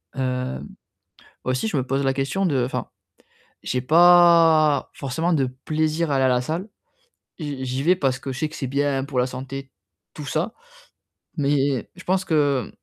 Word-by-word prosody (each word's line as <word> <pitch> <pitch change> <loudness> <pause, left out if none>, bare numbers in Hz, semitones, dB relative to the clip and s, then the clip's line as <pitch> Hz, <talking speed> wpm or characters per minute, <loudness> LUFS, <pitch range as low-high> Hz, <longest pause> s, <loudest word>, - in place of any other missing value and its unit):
Hem, 125 - -3 0.8
aussi 130 +9 0
je 160 - -2
me 130 - +1
pose 135 +1 -1
la 135 -1 +1
question 140 +8 -1
de 140 -8 +1
enfin, 125 - -4 0.7
j'ai 125 - -1
pas 165 -1 +5
forcément 150 +6 -2
de 140 -5 +2 0.2
plaisir 155 +1 0
à 140 - +2
aller 135 - +2
à - - +4
la 125 -1 +2
salle 165 - -4 0.7
et 160 - -6
j 140 -3 -4
j'y 130 +1 -2
vais, 180 +5 +4
parce 135 -6 0
que 135 +1 -5
je 130 - -7
sais 155 - -1
que 155 - -11
c'est 135 - -3
bien 140 0 0
pour 135 -2 -4
la 125 - +3
santé, 135 +1 -7 0.4
tout 150 - -8
ça. 170 +10 -2 0.8
Mais 140 -4 0
je 185 - -12
pense 185 +1 0
que, 145 -6 +1
140 Hz, 180 wpm, -23 LUFS, 130-160 Hz, 0.8 s, pas